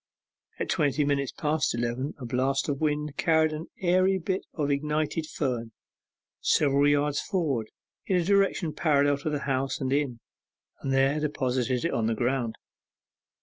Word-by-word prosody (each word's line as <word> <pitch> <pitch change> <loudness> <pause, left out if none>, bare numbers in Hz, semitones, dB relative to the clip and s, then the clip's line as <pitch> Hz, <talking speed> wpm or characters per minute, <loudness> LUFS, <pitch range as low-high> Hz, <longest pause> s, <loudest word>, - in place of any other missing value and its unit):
At - - -3
twenty 145 0 +1
minutes 140 -2 0
past 150 -4 0
eleven 120 +4 -2
a 130 - -7
blast 130 +3 0
of 140 0 -2
wind 150 -1 -1
carried 160 -1 +3
an 155 +2 -5
airy 185 +1 +3
bit 185 +2 -2
of 145 -3 0
ignited 150 +2 -1
fern 120 -7 -3 0.7
several 140 -1 +3
yards 145 0 +2
forward, 145 - -1 0.4
in 190 - +2
a 180 - +3
direction 195 -3 +2
parallel 145 -2 +2
to 150 - -2
the 145 -2 -2
houses 135 -1 -1
and 135 -1 -1
inn, 140 -5 0 0.6
and 135 - -3
there 135 +2 +3
deposited 130 -3 -1
it 170 - 0
on 110 -1 +1
the 115 - 0
ground. 120 -1 -1
145 Hz, 155 wpm, -27 LUFS, 130-155 Hz, 0.7 s, carried